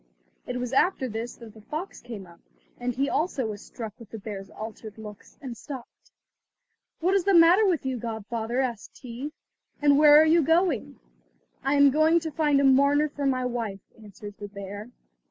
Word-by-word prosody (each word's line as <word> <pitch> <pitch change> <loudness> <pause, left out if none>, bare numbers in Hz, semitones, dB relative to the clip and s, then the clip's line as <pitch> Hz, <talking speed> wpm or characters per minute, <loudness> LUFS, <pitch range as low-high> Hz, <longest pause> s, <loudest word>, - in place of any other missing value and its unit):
It 250 - -3
was 250 +1 -4
after 270 -2 +2
this 230 +1 -5
that 230 -3 -13
the 220 - -15
fox 310 - -6
came 225 -5 -8
up, 170 -1 -17 0.4
and 245 0 -2
he 275 +2 +1
also 300 -6 -1
was 210 -2 -5
struck 220 -4 -8
with 230 -3 -13
the 225 - -7
bear's 200 -2 -7
altered 220 0 -9
looks, 210 -2 -11
and 250 -3 -6
stopped. 255 +1 -10 0.9
"What 365 +3 +2
is 395 -2 +3
the 395 0 +3
matter 345 +5 +7
with 340 -7 0
you, 260 -1 -1
godfather?" 225 +2 -3
asked 240 -5 -4
he, 255 +3 -7 0.5
"and 285 -1 +4
where 300 0 +8
are 315 - +6
you 325 +2 +5
going?" 325 - +1 0.6
"I 275 +2 +1
am 285 -1 +6
going 315 +4 +4
to 320 -1 -4
find 295 -3 +2
a - - +2
mourner 280 +3 +4
for 285 -1 -3
my 255 -1 0
wife," 230 -6 -3 0.2
answered 205 0 -10
the 205 - -6
bear. 200 +2 -8
255 Hz, 190 wpm, -26 LUFS, 220-295 Hz, 0.9 s, where